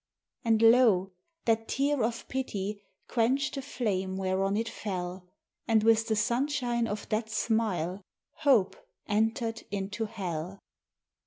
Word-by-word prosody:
And 225 -1 +3
lo! 225 -5 +5 0.3
that 225 -1 +2
tear 280 0 +1
of 230 +1 -2
Pity 210 -6 -3 0.3
quenched 265 +5 +1
the 275 - -3
flame 195 -8 -2
whereon 195 +1 0
it 225 +1 -1
fell, 180 -4 -5 0.4
And, 220 -2 +4
with 225 0 +4
the 220 - +1
sunshine 240 0 0
of 205 -1 -4
that 220 +1 -1
smile, 210 -5 0 0.4
hope 260 -11 +3 0.3
entered 225 +2 0
into 205 +2 -3
hell! 185 -4 -4
220 Hz, 125 wpm, -29 LUFS, 195-235 Hz, 0.4 s, lo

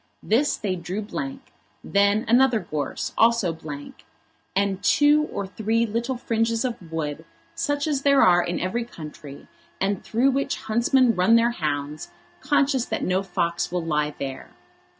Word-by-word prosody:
This 270 +7 +2
they 195 -4 -2
drew 180 +4 -4
blank, 270 +5 -6 0.3
then 200 +2 +2
another 245 0 +4
gorse 155 -6 -4
also 225 -6 +3
blank, 150 -3 -9 0.5
and 195 -1 0
two 295 +1 +4
or 200 - -3
three 220 +4 0
little 235 +4 -2
fringes 230 0 0
of 195 -9 -5
wood, 155 -1 -3 0.3
such 290 0 -1
as 290 -3 0
there 280 -1 +5
are 175 -1 +5
in 175 0 -2
every 210 +7 -1
country, 150 -9 -11 0.3
and 195 0 -1
through 250 +5 +2
which 275 +1 -1
huntsmen 235 +2 +3
run 185 +4 +4
their 230 +1 +4
hounds, 150 -5 -3 0.3
conscious 275 -3 +1
that - - -3
no 185 +1 +1
fox 170 -4 -2
will 175 -2 -2
lie 150 -2 -1
there. 135 -1 -6
205 Hz, 150 wpm, -24 LUFS, 170-240 Hz, 0.5 s, there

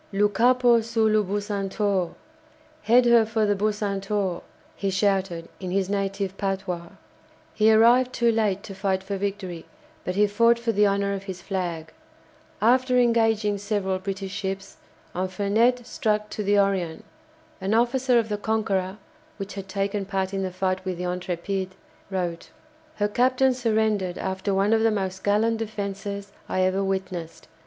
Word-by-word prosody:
"Lou 205 +1 +3
capo 240 +2 +4
sur 225 0 0
lou 215 0 +3
'Bucentaure'!" 200 -2 -1 0.7
("Head 240 +4 +5
her 235 -1 +6
for 220 0 0
the 205 - +2
'Bucentaure'!") 200 -2 -1 0.3
he 195 - -2
shouted 190 -3 0
in 185 - -5
his 190 +1 0
native 195 -1 -2
patois. 190 -3 -2 0.7
He 220 +1 +4
arrived 240 +3 +5
too 235 -2 +2
late 210 -3 0
to 195 - -8
fight 190 -1 -1
for 200 +1 -4
victory, 195 -4 -4 0.4
but 180 - -3
he 210 +1 +4
fought 230 +3 +3
for 235 0 -1
the 210 -1 +4
honour 200 0 0
of 195 0 -5
his 185 -3 -7
flag. 170 -5 -4 0.7
After 255 +2 +4
engaging 225 -4 +2
several 200 -2 -1
British 195 0 -5
ships, 195 -1 -5 0.4
Infernet 205 +7 +1
struck 210 -3 -1
to 215 - -4
the 205 0 +2
"Orion." 195 -2 0 0.6
An 195 +3 0
officer 245 +2 +3
of 230 -2 +2
the 210 -1 -3
"Conqueror" 205 -3 -1 0.4
(which 200 -1 -6
had 195 -1 -7
taken 195 +1 -2
part 190 -1 -2
in 195 - -1
the 190 - -1
fight 185 0 -1
with 185 -2 -3
the 180 - -4
"Intrépide") 180 +1 -3 0.4
wrote: 175 -3 -3 0.5
"Her 205 - +1
captain 255 +4 +3
surrendered 220 -6 0
after 190 +1 -2
one 195 +3 +2
of 225 - +3
the 225 - +4
most 190 -3 -3
gallant 220 +3 +2
defences 200 -2 -5 0.2
I 185 - 0
ever 185 +1 +1
witnessed. 185 -4 -4
200 Hz, 155 wpm, -25 LUFS, 190-220 Hz, 0.7 s, her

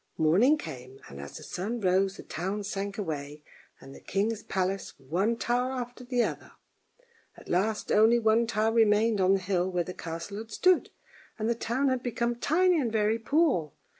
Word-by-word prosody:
Morning 195 - +4
came, 130 - -9
and 70 0 -9
as 70 - -8
the - - -10
sun 215 +7 -4
rose 190 0 +1
the - - -9
town 195 +5 -4
sank 200 0 -4
away 150 -6 -5 0.4
and 135 0 -12
the - - -12
king's 210 +3 -1
palace, 190 -1 -2
one 185 - -1
tower 245 +2 0
after 245 0 -6
the 245 -1 +1
other; - - -5 0.8
at - - -15
last 210 +5 0
only 220 +3 +5
one 225 0 +3
tower 220 0 +1
remained 220 -1 +3
on 190 +1 +4
the - - 0
hill 185 -1 0
where 180 -1 0
the 180 - -7
castle 170 +5 -6
had 225 0 -8
stood, 365 +10 +3 0.5
and 220 -1 -2
the 235 - +2
town 240 +4 -1
had 255 -1 0
become 240 -1 -1
tiny 340 +6 +2
and 235 -4 -1
very 220 +1 +1
poor. 250 - +1
210 Hz, 185 wpm, -28 LUFS, 185-235 Hz, 0.8 s, only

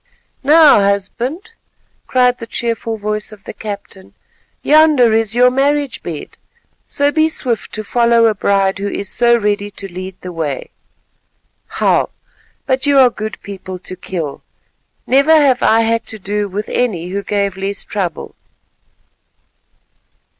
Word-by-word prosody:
"Now, 305 -2 +6
husband," 215 - -2 0.6
cried 250 -1 +2
the 230 - -8
cheerful 230 -1 -2
voice 210 0 -2
of 210 -2 -14
the - - -8
captain, 200 -2 -9 0.5
"yonder 300 -7 +5
is 225 0 +2
your 250 +1 +5
marriage 280 0 0
bed, 160 -4 -7 0.5
so 285 0 +1
be 315 +1 +2
swift 245 -7 -2
to 215 - -4
follow 235 +1 +3
a 225 - +3
bride 195 -1 +1
who 200 - -2
is 200 -1 -4
so 235 0 +3
ready 205 -2 -1
to 200 -1 -8
lead 185 +1 -7
the 180 - -7
way. 155 -5 -4 1.1
Wow! - - +2 0.6
but 260 +2 0
you 285 -1 +4
are 255 -2 +6
good 215 -1 -6
people 190 -2 -7
to 185 0 -8
kill; 170 -5 -5 0.6
never 280 +5 +4
have 265 -4 +3
I 225 +1 +4
had 230 0 0
to 220 - -5
do 205 +1 -2
with 205 +2 -5
any 180 -9 -1
who 200 +2 -3
gave 200 -1 -1
less 195 +1 -4
trouble. 180 -7 -4
215 Hz, 145 wpm, -16 LUFS, 200-250 Hz, 1.1 s, Now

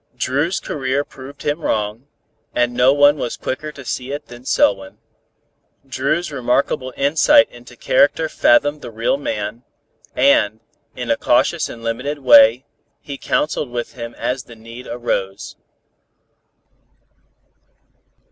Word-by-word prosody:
Dru's 145 +8 0
career 135 0 -2
proved 140 0 -12
him 150 +3 -1
wrong, 110 +1 -2 0.5
and 120 0 +1
no 125 +2 +4
one 145 +1 +5
was 120 - -4
quicker 155 +4 -4
to 140 -2 -11
see 130 +2 -4
it 145 +1 -6
than 120 +1 -12
Selwyn. 95 -6 +1 0.9
Dru's 150 +6 -1
remarkable 130 0 0
insight 160 - +4
into 120 0 -14
character 145 +6 +2
fathomed 145 +1 +2
the 120 - -7
real 115 +3 0
man, 110 -3 -4 0.5
and, 110 -5 +3 0.4
in - - -3
a - - +2
cautious - - +1
and 115 - -10
limited 125 +6 -3
way, 120 -1 +6 0.3
he 140 - -8
counseled 150 -2 -1
with 120 -1 -5
him 115 -1 -8
as 130 +1 -3
the 120 - -13
need 115 +3 -11
arose. 100 -5 -3
130 Hz, 130 wpm, -19 LUFS, 115-145 Hz, 0.9 s, way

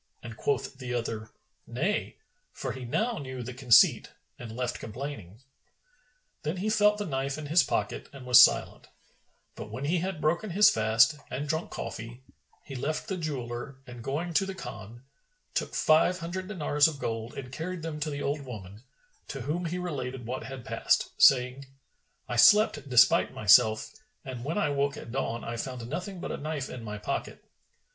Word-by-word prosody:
and 115 -1 -8
quoth 135 +1 -2
the 125 -1 -4
other, 115 -2 -3 0.4
"Nay!"; - - -2 0.3
for - - -5
he 130 -1 -7
now 220 - -1
knew 130 -3 -6
the 125 +2 -6
conceit 125 -2 +5 0.3
and 120 -2 -8
left 125 -1 -2
complaining. 115 -4 -7 1.0
Then 155 +4 -3
he 210 +4 -1
felt 210 -1 +4
the 205 - -3
knife 135 -3 -2
in 155 - -6
his 160 +4 +4
pocket - - -2
and 135 -2 -11
was 125 -1 +9
silent; - - +3 0.7
but 105 - -8
when 125 +6 -5
he 170 +4 +1
had 185 -1 -3
broken 170 +8 0
his 200 +4 +6
fast 110 +7 +4
and 145 +3 -4
drunk 160 +2 -2
coffee, 120 +3 -7 0.4
he 140 - -10
left 150 - -3
the 190 - -1
jeweller 135 -5 -5
and 120 -2 -10
going 165 +7 -3
to 190 +4 +2
the 195 - -5
Khan; 120 - -9 0.5
took - - -2
five 160 +3 +4
hundred 185 +2 -5
dinars 150 -6 +2
of 155 -3 -4
gold 115 -2 -4
and 125 -2 -7
carried 170 +3 -5
them 160 -2 -4
to 155 +1 -2
the 145 -1 -4
old 145 +1 -1
woman, 105 -5 -9 0.5
to 135 - -6
whom 155 +8 -2
he 170 +2 -2
related 130 -8 -4
what 125 +3 -4
had 135 -3 -8
passed, - - +1
saying, 130 +1 +5 0.6
"I 120 - -3
slept 210 - +5
despite 125 -1 +5
myself, 110 +1 +5 0.3
and 125 -3 -6
when 160 +7 -2
I 150 - +1
woke 140 0 0
at 115 - -9
dawn 120 -3 -2
I 115 0 -4
found 125 -1 -5
nothing 180 +7 -5
but - - -5
a - - -3
knife 150 -2 -4
in 120 - -7
my 105 -1 -5
pocket." 105 - -4
135 Hz, 180 wpm, -28 LUFS, 120-160 Hz, 1.0 s, was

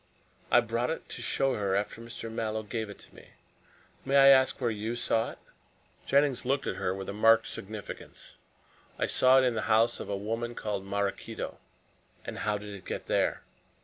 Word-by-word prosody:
"I 120 - +6
brought 115 +2 -1
it 160 - -4
to - - -6
show 135 -1 +1
her 100 -4 0
after 105 +3 -2
Mr. 115 -1 -7
Mallow 110 -1 -2
gave 110 0 -4
it 100 - -9
to - - -15
me. - - -15 0.8
May 135 +1 0
I 135 0 +8
ask 130 -1 +5
where 120 -3 0
you 110 +2 -3
saw 115 -1 0
it?" - - -16 0.7
Jennings 140 -2 +3
looked 135 +2 0
at - - -3
her 90 - -1
with 95 0 -6
marked 115 +2 +5
significance. 105 +1 -8 0.6
"I - - +1
saw 130 +1 +5
it 130 - +5
in 125 - +2
the 110 - -1
house 110 +2 +4
of - - -6
a 100 - -1
woman 115 +4 -3
called 100 -3 -3
Maraquito." 100 0 -3 0.7
"And - - -6
how 105 -1 0
did 105 0 -8
it 95 -2 -10
get - - -5
there?" - - 0
115 Hz, 190 wpm, -29 LUFS, 105-120 Hz, 0.8 s, I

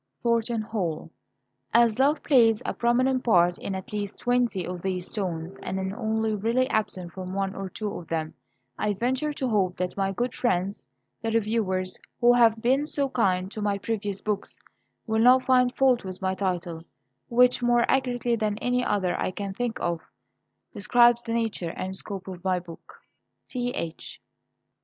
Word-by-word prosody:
THORNTON 235 -1 +1
HALL. 190 -8 -3 0.6
_As 235 -1 +4
love 285 +3 +3
plays 230 -6 +4
a - - -1
prominent 255 +2 +2
part 175 -5 +3
in 195 - -4
at 190 +2 -7
least 205 -1 -3
twenty 245 -7 0
of 180 0 -5
these 185 -1 -3
stones, 180 -2 -4
and 190 +1 -4
is 190 0 -3
only 220 -1 -1
really 230 +5 +1
absent 185 -5 -1
from 185 0 -6
one 195 -1 -1
or 195 -1 -5
two 210 +1 -4
of 170 - -12
them, 160 -1 -2 0.5
I 210 -1 0
venture 260 +8 0
to 265 -2 -2
hope 195 -6 +1
that 180 0 -2
my 195 -1 0
good 240 +5 -2
friends, 185 - -1 0.3
the 225 - -1
reviewers, 210 -4 0 0.2
who 240 0 +6
have 230 -2 +4
been 270 +5 +2
so 280 -3 0
kind 190 -6 +1
to 215 - -6
my 205 -1 0
previous 205 -1 -3
books, 210 -2 -3 0.5
will 220 -1 +1
not 255 +2 +6
find 250 -1 +4
fault 260 -3 +3
with 185 -1 -6
my 190 -1 0
title, 180 -3 -2 0.5
which, 250 +1 +4
more 240 0 +3
accurately 245 -2 +1
than 215 -2 -1
any 245 +2 0
other 195 -6 0
I - - 0
can 195 +1 -5
think 240 +2 -3
of, 170 -1 -1 0.7
describes 240 +3 +4
the 230 -1 -4
nature 220 -7 -2
and 190 +1 -4
scope 195 -1 -4
of 185 -2 -8
my 185 -1 +1
book_. 170 -2 -13 0.6
T.H. 245 -10 -4
215 Hz, 170 wpm, -26 LUFS, 185-240 Hz, 0.7 s, who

